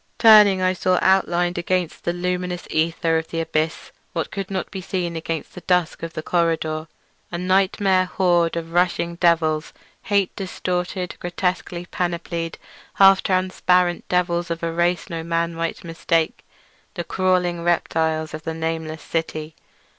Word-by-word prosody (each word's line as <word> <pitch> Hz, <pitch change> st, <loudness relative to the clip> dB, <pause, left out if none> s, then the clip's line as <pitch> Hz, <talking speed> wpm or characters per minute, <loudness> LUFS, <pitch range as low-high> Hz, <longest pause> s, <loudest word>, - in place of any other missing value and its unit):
Turning, 210 Hz, -4 st, +7 dB
I 185 Hz, 0 st, +3 dB
saw 185 Hz, 0 st, +1 dB
outlined 175 Hz, -2 st, +2 dB
against 180 Hz, -1 st, -2 dB
the 170 Hz, -, +1 dB
luminous 180 Hz, 0 st, -3 dB
aether 165 Hz, 0 st, +1 dB
of 160 Hz, -, -7 dB
the 165 Hz, -, -4 dB
abyss 160 Hz, -1 st, -2 dB, 0.2 s
what 165 Hz, -, -3 dB
could 195 Hz, -1 st, -4 dB
not 190 Hz, -2 st, -3 dB
be 190 Hz, -, -5 dB
seen 180 Hz, -2 st, -3 dB
against 165 Hz, 0 st, -4 dB
the 180 Hz, -, -9 dB
dusk 180 Hz, -3 st, +1 dB
of 165 Hz, 0 st, -5 dB
the 155 Hz, -, -5 dB
corridor—a 165 Hz, 0 st, -2 dB
nightmare 185 Hz, +1 st, +2 dB
horde 175 Hz, -2 st, +2 dB
of 165 Hz, 0 st, -5 dB
rushing 175 Hz, -1 st, +1 dB
devils; 160 Hz, -3 st, +2 dB, 0.3 s
hate 200 Hz, -2 st, +1 dB
distorted, 180 Hz, -1 st, -3 dB
grotesquely 180 Hz, 0 st, -2 dB
panoplied, 170 Hz, -2 st, -3 dB, 0.4 s
half 195 Hz, -1 st, +7 dB
transparent; 180 Hz, -1 st, +1 dB
devils 175 Hz, -1 st, +1 dB
of 170 Hz, 0 st, -4 dB
a 165 Hz, 0 st, -1 dB
race 175 Hz, +1 st, +1 dB
no 165 Hz, -3 st, -4 dB
man 170 Hz, 0 st, -1 dB
might 165 Hz, 0 st, -3 dB
mistake—the 165 Hz, +1 st, -3 dB
crawling 180 Hz, -1 st, 0 dB
reptiles 160 Hz, -2 st, 0 dB
of 155 Hz, -, -5 dB
the 160 Hz, 0 st, -4 dB
nameless 160 Hz, -1 st, -3 dB
city. 160 Hz, -1 st, -3 dB
175 Hz, 140 wpm, -22 LUFS, 165-185 Hz, 0.4 s, Turning